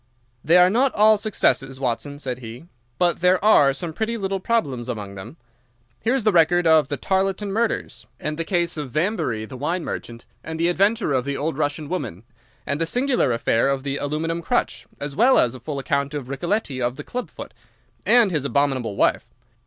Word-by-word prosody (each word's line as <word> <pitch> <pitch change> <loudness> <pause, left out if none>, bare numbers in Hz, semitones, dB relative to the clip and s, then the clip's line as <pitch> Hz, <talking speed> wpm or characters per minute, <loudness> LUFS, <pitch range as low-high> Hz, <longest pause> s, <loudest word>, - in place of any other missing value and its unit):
"They 165 +4 +5
are 180 +1 +6
not 255 +5 +2
all 215 +1 +6
successes, 135 - 0
Watson," 135 +3 -2
said 130 -3 -5
he. 120 +4 -9 0.3
"But 175 -1 +1
there 180 +2 +4
are 145 -10 +6
some 160 +4 -5
pretty 225 +5 -2
little 195 -2 -2
problems 140 - -1
among 105 -5 -5
them. 100 - -10 0.6
Here's 250 +1 0
the 215 - +3
record 175 0 +3
of 160 -3 +5
the 145 - -3
Tarleton 195 +1 -1
murders, 225 +3 -2
and 150 0 -3
the 165 - -2
case 170 -1 -1
of 145 -3 -4
Vamberry, 155 - -1
the 130 - -9
wine 165 +6 -2
merchant, 115 0 -6 0.2
and 160 0 -6
the 170 +1 +2
adventure 200 -1 +1
of 130 -2 +1
the 140 +1 -3
old 155 0 -2
Russian 145 0 -2
woman, 125 - -4 0.4
and 140 +3 -2
the 165 - +1
singular 245 - +1
affair 115 +2 +1
of 135 -1 -1
the 140 0 -2
aluminium 160 +4 -2
crutch, - - -1
as 145 -1 -5
well 255 - +5
as 120 - +3
a 130 - -9
full 140 +4 -5
account 140 +1 -1
of 135 -4 -5
Ricoletti 140 -1 -2
of 120 +1 -1
the - - -8
club 250 0 -5
foot, - - -10 0.5
and 235 -5 +5
his 150 -5 -1
abominable 135 -6 0
wife. - - +1
155 Hz, 195 wpm, -22 LUFS, 135-190 Hz, 0.6 s, are